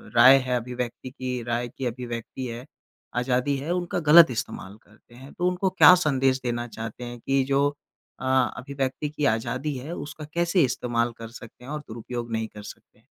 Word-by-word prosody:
राय 130 +3 +9
है 125 -1 0
अभिव्यक्ति 125 +1 -4
की 125 -2 -4
राय 120 +1 -1
की 130 +2 -7
अभिव्यक्ति 120 +1 -5
है 120 +2 -7 0.5
आज़ादी 125 +3 +1
है, 150 +6 -4
उनका 175 0 -2
ग़लत 160 -2 +8
इस्तेमाल 110 -3 -5
करते 110 +3 -22
हैं। 135 +3 -12
तो 180 0 0
उनको 180 +1 +1
क्या 180 0 +8
संदेश 135 -5 +2
देना 120 0 -2
चाहते 115 +1 -7
हैं 120 0 -7
कि 135 +2 +1
जो 140 +1 +2 0.5
अ, 130 - -6 0.3
अभिव्यक्ति 135 +3 -3
की 150 -1 -2
आज़ादी 140 +5 -3
है, 140 +6 -7
उसका 150 +1 -7
कैसे 170 0 +2
इस्तेमाल 120 -2 0
कर 115 0 -7
सकते 115 +1 -13
हैं 140 - -8
और 150 - -3
दुरुपयोग 120 +1 -6
नहीं 110 0 -1
कर 105 -1 -12
सकते? - - -14
125 Hz, 180 wpm, -25 LUFS, 120-145 Hz, 0.5 s, राय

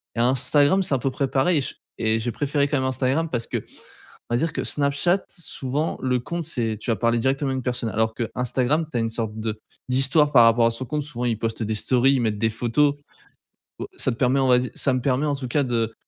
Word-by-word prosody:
Et - - -3
Instagram, 140 +8 +3
c'est 160 - 0
un - - -1
peu 135 +2 -1
près 135 +1 -1
pareil 150 +5 +2
et - - -1
je - - -4 0.2
et 110 0 +1
j'ai 120 +1 -2
préféré 145 0 0
quand 145 - -1
même 130 - -1
Instagram 130 +5 0
parce 120 -4 -3
qu'on - - -2 0.7
va 120 - +2
dire 165 +5 0
que - - -3
Snapchat, 145 +6 +1
souvent 150 -3 -3
le 125 -1 +1
compte 170 +7 -4
c'est, 115 -8 -2
tu 115 - -4
vas 110 - +1
parler 115 0 +1
directement 135 +3 0
à - - -1
une 130 - -3
personne, 120 -2 -1
alors 110 +1 0
que 115 -1 -3
Instagram, 130 +5 0
tu 120 - -2
as - - +1
une 115 - 0
sorte 110 -1 -3
de 110 -1 -3 0.3
d'histoire 135 +4 +4
par 120 -3 +7
rapport 115 0 +4
à - - +3
son 115 +3 -4
compte, 150 +1 -2
souvent 125 -4 -5
ils 115 -2 0
postent 115 0 -3
des 110 0 -1
stories, 130 +4 +2
ils 130 - +1
mettent 110 -3 0
des 110 +1 +1
photos. 125 +6 +1 0.9
Au - - -4
ça 130 - +1
me - - -7
permet 130 +2 +2
on 130 - +2
va 125 -1 +5
dire, 125 -3 -4
ça 135 - +2
me 130 - 0
permet 135 +3 0
en 145 - 0
tout 130 -3 -6
cas 145 +4 +1
de 115 -2 -1
130 Hz, 260 wpm, -23 LUFS, 115-140 Hz, 0.9 s, par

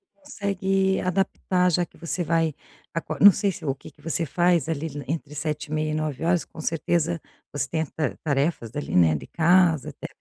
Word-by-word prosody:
consegue 195 -8 0
adaptar, 180 0 +1
já 175 +1 +2
que - - -23
você 170 +1 -3
vai 165 -1 +1 0.4
acor 165 - -4
não 205 - +10
sei 200 +1 0
se 165 - -9
o 135 - +1
que 135 - -13
que - - -24
você 165 +1 -1
faz, 175 +1 +2
ali, 160 0 -2 0.2
entre 150 0 -4
7h30 155 0 -2
e - - -2
9h, 155 +3 0
com 160 - -10
certeza 165 +1 0 0.3
ostenta 155 +1 -2
tarefas, 140 -5 0
ali, 145 - -3
né, 80 -3 +5
de 75 - -5
casa, 170 -2 +3
até - - -8
165 Hz, 170 wpm, -25 LUFS, 150-180 Hz, 0.4 s, não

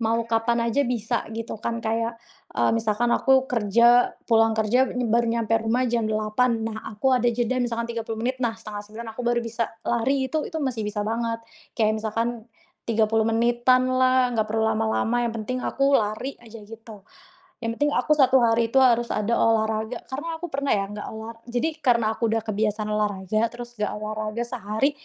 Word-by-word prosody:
mau 230 0 +1
kapan 230 +1 +1
aja 285 - +2
bisa 235 -1 -2
gitu 225 -1 -5
kan, 230 0 -2
kayak, 230 +1 -1 0.4
eee, - - +3
misalkan 230 +1 +1
aku 265 -1 +4
kerja, 235 +1 +3
pulang 225 -1 +3
kerja 245 +4 +2
baru 235 -1 +1
nyampe 230 -1 0
rumah 230 +3 +1
jam 230 -3 0
8.00 220 +2 0
Nah, 220 -1 -4 0.2
aku 265 +5 +2
ada 245 -1 +3
jeda 240 +2 0
misalkan 235 -1 -1
30 225 -1 -4
menit, 255 +1 -2
nah 230 -2 -1
8:30 215 +1 -8
aku 225 - -7
baru 240 0 +1
bisa 230 0 -2 0.2
lari, 260 +3 +1
itu 310 -1 -1
itu - - -6
masih 235 -5 -2
bisa 210 0 -3
banget. 230 +1 -2 0.4
Kayak 215 -1 +1
misalkan 225 +2 -1 0.6
30 220 0 +2
menitan 240 +2 +3
lah, 255 -1 +3
nggak 220 -2 0
perlu 220 +1 0
lama-lama, 220 +2 +1
yang 225 - -4
penting 255 +4 -3
aku 275 +2 +1
lari 220 +3 0
aja 230 -1 -12
gitu. 220 -2 -12 0.6
Yang 230 0 -1
penting 290 0 +2
aku 250 +5 +2
1 265 -1 +5
hari 230 0 +3
itu 250 - -5
harus 240 -2 +4
ada 215 +3 0
olahraga. 220 +1 +1
Karena 310 +5 -4
aku 345 0 -7
pernah 280 +1 0
ya, 200 -1 0
nggak 210 0 -6
ola 220 +1 -7 0.2
jadi 245 +6 -1
karena 235 -6 +2
aku 230 +1 -1
udah 225 0 0
kebiasaan 215 0 -1
olahraga, 210 0 0
terus 240 0 -10
nggak 210 -1 -1
olahraga 215 +1 -4
sehari, 235 +1 -1
230 Hz, 180 wpm, -24 LUFS, 220-245 Hz, 0.6 s, 1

